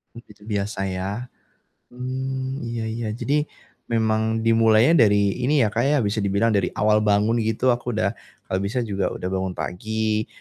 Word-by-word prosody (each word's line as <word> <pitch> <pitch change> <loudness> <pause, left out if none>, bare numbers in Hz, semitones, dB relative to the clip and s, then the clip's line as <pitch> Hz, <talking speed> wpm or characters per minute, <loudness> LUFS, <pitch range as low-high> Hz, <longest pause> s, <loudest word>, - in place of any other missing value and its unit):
I - - -8
itu 105 0 -17
biasa 105 -2 -3
ya. 100 +7 -4 0.6
Mmm, 130 +1 -4
iya 115 -1 -3
iya. 115 0 -3
Jadi, 145 +5 0 0.4
memang 110 -1 +1
dimulainya 115 +6 +4
dari 100 0 +2
ini 145 +2 +3
ya, 110 - +2
Kak, 115 +4 0
ya, 150 +1 +3
bisa 105 +1 -1
dibilang 100 +2 +1
dari 100 -4 +1
awal 105 0 +3
bangun 105 +3 +2
gitu, 115 +3 +1
aku 120 0 -1
udah 100 -2 +1 0.4
kalau 95 - 0
bisa 100 +6 -1
juga 100 -4 -2
udah 90 - -4
bangun 95 -1 -2
pagi, 110 +4 -2
110 Hz, 165 wpm, -23 LUFS, 100-120 Hz, 0.6 s, dimulainya